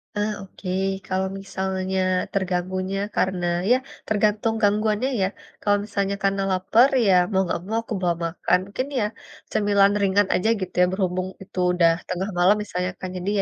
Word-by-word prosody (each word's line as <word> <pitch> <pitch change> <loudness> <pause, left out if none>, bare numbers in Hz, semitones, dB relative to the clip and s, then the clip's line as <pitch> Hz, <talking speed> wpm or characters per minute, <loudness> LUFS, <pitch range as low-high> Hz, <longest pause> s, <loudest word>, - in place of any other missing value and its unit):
Ah, 210 +1 0
oke, 195 -1 -9 0.4
kalau 190 0 0
misalnya 190 -1 -2 0.3
terganggunya 185 0 -1 0.2
karena 185 -2 0 0.2
iya, 250 +3 +5 0.3
tergantung 215 +1 +1
gangguannya 215 +4 +2
ya. 190 - +3 0.3
Kalau 205 0 +3
misalnya 200 -1 -1
karena 195 0 +1
laper 205 +8 +4 0.2
ya 195 - +5 0.2
mau 190 - +3
enggak 170 -1 -2
mau 225 +1 +1
aku 225 - -6
bawa 175 -2 +1
makan, 170 +2 +1
mungkin 255 +5 -2
ya 210 - +1 0.5
cemilan 200 -1 +4
ringan 200 +1 +3
aja 220 +5 +1
gitu 185 - -4
ya. - - +7
Berhubung 185 -1 -1 0.2
itu 185 - -8 0.2
udah 170 -2 +5 0.2
tengah 185 +2 -2
malam 185 +4 +5
misalnya 180 -3 -3
kan, 185 - -4
jadi 180 +2 -3
195 Hz, 160 wpm, -23 LUFS, 185-205 Hz, 0.5 s, ya